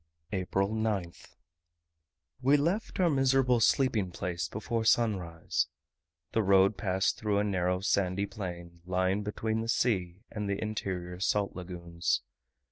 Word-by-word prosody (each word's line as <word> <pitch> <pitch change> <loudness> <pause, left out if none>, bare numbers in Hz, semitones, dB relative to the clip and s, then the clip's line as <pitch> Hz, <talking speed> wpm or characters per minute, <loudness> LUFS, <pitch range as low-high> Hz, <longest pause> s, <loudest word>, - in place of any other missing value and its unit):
April 95 0 0
9th. 105 -6 -3 1.1
We 140 +3 +5
left 175 +11 -1
our 180 - +4
miserable 135 -3 +3
sleeping 115 -4 +2
place 85 -1 -3
before 110 +3 -2
sunrise. 95 -8 +1 0.6
The 110 - +2
road 95 0 +4
passed 95 -2 0
through 105 -2 0
a 100 - +2
narrow 90 -2 0
sandy 95 0 +1
plain, 85 -5 -7
lying 95 +2 0
between 110 +2 -2
the 115 - -4
sea 95 -6 0
and 105 -2 -3
the 100 - -1
interior 95 -5 -4
salt 100 +1 0
lagoons. 85 -2 -2
100 Hz, 125 wpm, -30 LUFS, 90-110 Hz, 1.1 s, We